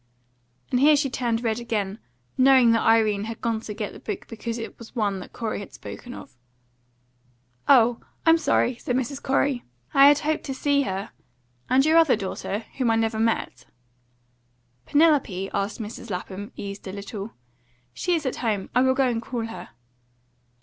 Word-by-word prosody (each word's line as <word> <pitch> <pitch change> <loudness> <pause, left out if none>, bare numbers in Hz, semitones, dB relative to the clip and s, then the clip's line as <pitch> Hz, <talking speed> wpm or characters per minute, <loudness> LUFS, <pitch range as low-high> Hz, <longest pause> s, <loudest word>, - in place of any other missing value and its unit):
And 250 - +2
here 295 +3 +6
she 280 -2 0
turned 235 -2 -1
red 225 0 0
again, 215 -3 -3 0.4
knowing 255 -2 +6
that 230 -1 +3
Irene 215 -2 +3
had 225 +1 -6
gone 230 -1 -1
to 215 - -6
get 210 -2 -4
the - - -11
book - - -5
because 230 0 -5
it 225 - -7
was 230 +2 -12
one 205 -4 0
that 185 - -10
Corey 225 -3 -3
had 205 - -9
spoken 245 +1 -9
of. - - -12 1.3
"Oh! 245 -3 +5 0.3
I'm 325 0 +6
sorry," 260 -5 +1
said 245 - -2
Mrs. 260 +2 -2
Corey. 270 -1 +1 0.3
"I 275 0 +8
had 290 0 +6
hoped 310 +1 -1
to 270 - -4
see 285 +1 +2
her. 195 +3 -4 0.6
And 260 +2 +4
your 320 +1 +6
other 320 -7 +5
daughter, 205 +1 -4
whom 250 -3 +2
I 225 - +3
never 225 -1 0
met?" 220 - -1 1.2
"Penelope?" 285 - +2
asked 200 +3 -2
Mrs. 225 +1 -7
Lapham, 195 +3 -5
eased 200 0 -7
a - - -4
little. 200 +2 -7 0.6
"She 355 - 0
is 315 -3 -3
at 260 - -2
home. 210 -5 -2
I 250 - +4
will 260 0 +3
go 265 -1 +3
and 235 -2 -1
call 235 -1 -4
her." 225 - -8
230 Hz, 175 wpm, -25 LUFS, 210-265 Hz, 1.3 s, I